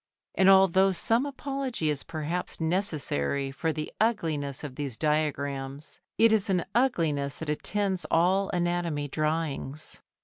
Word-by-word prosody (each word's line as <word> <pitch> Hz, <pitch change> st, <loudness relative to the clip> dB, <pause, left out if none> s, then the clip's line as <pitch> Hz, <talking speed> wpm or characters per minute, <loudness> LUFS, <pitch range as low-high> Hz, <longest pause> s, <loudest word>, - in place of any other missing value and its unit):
And 190 Hz, 0 st, +4 dB
although 190 Hz, 0 st, +6 dB
some 230 Hz, +8 st, +1 dB
apology 270 Hz, -, -2 dB
is 140 Hz, -2 st, -2 dB
perhaps 165 Hz, +2 st, -3 dB
necessary 155 Hz, -, 0 dB
for 160 Hz, +4 st, -1 dB
the 155 Hz, -1 st, -5 dB
ugliness 155 Hz, -, 0 dB
of 145 Hz, -3 st, -6 dB
these 135 Hz, -4 st, -4 dB
diagrams, 145 Hz, -2 st, -2 dB, 0.2 s
it 230 Hz, 0 st, +5 dB
is 215 Hz, -2 st, +2 dB
an 180 Hz, -3 st, +1 dB
ugliness 160 Hz, -, +1 dB
that 160 Hz, -2 st, -3 dB
attends 195 Hz, +4 st, -1 dB
all 190 Hz, +4 st, +3 dB
anatomy 175 Hz, -4 st, -1 dB
drawings. 155 Hz, -1 st, -3 dB
160 Hz, 130 wpm, -28 LUFS, 145-190 Hz, 0.2 s, although